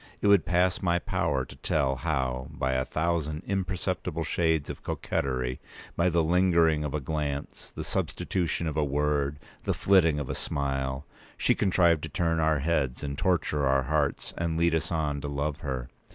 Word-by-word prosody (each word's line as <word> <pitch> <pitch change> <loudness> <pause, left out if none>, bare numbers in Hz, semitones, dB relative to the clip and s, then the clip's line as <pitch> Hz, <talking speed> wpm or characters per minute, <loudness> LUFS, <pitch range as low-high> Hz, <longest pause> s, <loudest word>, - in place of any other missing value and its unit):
It - - -4
would 100 -4 +5
pass 90 +1 +2
my 85 -2 +2
power 80 -7 -1
to - - -12
tell 70 -3 0
how, 65 0 -1
by 65 - -2
a 65 0 0
thousand 80 -2 -1
imperceptible 90 -3 -2
shades 80 -2 +1
of - - -7
coquetry—by 65 +6 -2
the 85 -1 +2
lingering 85 -2 +3
of 75 0 -3
a - - 0
glance, 70 0 -4
the - - -6
substitution 85 -2 -1
of 80 -2 -2
a 80 - +2
word, 75 0 0 0.3
the - - 0
flitting 85 -6 +4
of 70 - -4
a - - -2
smile—she 70 0 -2
contrived 85 -4 +3
to 80 - -5
turn 85 +1 0
our 80 -1 +3
heads, 70 -4 0
and 70 -1 -3
torture 75 -4 +1
our 65 0 +3
hearts, 75 +1 -1
and 85 -1 -1
lead 85 0 +3
us 80 +1 -1
on 75 -3 -1
to 75 - -4
love 70 +1 -2
her. 65 -4 -4
75 Hz, 170 wpm, -28 LUFS, 70-85 Hz, 0.3 s, would